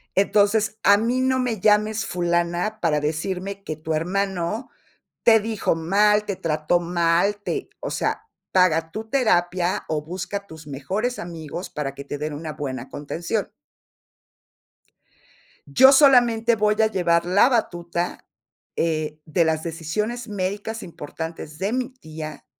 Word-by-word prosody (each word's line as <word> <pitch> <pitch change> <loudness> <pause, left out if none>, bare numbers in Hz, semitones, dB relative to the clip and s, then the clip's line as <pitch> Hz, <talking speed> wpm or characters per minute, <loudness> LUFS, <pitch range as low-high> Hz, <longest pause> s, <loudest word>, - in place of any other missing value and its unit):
Entonces, 210 +2 +2
a 200 0 +7
mí 240 +4 0
no 260 0 +2
me 240 -5 -1
llames 215 +1 +3
fulana, 175 +4 -1
para 155 -3 +2
decirme 185 +6 -3
que 155 - -4
tu 155 +1 -4
hermano 190 +4 -1 0.5
te 225 -1 +7
dijo 220 -4 -1
mal, 210 +6 +3
te 200 - -2
trató 155 +1 0
mal, 175 +3 +1
te 405 - -3
o - - -5
sea, 435 - -1 0.3
paga 165 -3 +3
tu 220 +3 -6
terapia, 180 -8 +1
o 155 -1 -1
busca 185 +4 -5
tus 160 -2 -12
mejores 190 - -3
amigos 170 +1 -6
para 140 -3 -4
que 140 - -7
te 145 - -5
den 150 +1 -4
una 155 +1 -5
buena 135 -2 -5
contención. 150 +5 -3 2.2
Yo 265 - +7
solamente 240 -5 +5
voy 210 0 +2
a 220 - +5
llevar 170 -4 +1
la 195 +8 +5
batuta, 175 -7 -2 0.5
eh, 155 -2 -1
de 165 +2 +2
las 160 -1 0
decisiones 210 +9 -3
médicas 205 +3 -3
importantes 160 -1 -7
de 200 +4 -1
mi 255 -1 -1
tía, 155 - -9
180 Hz, 140 wpm, -23 LUFS, 160-215 Hz, 2.2 s, a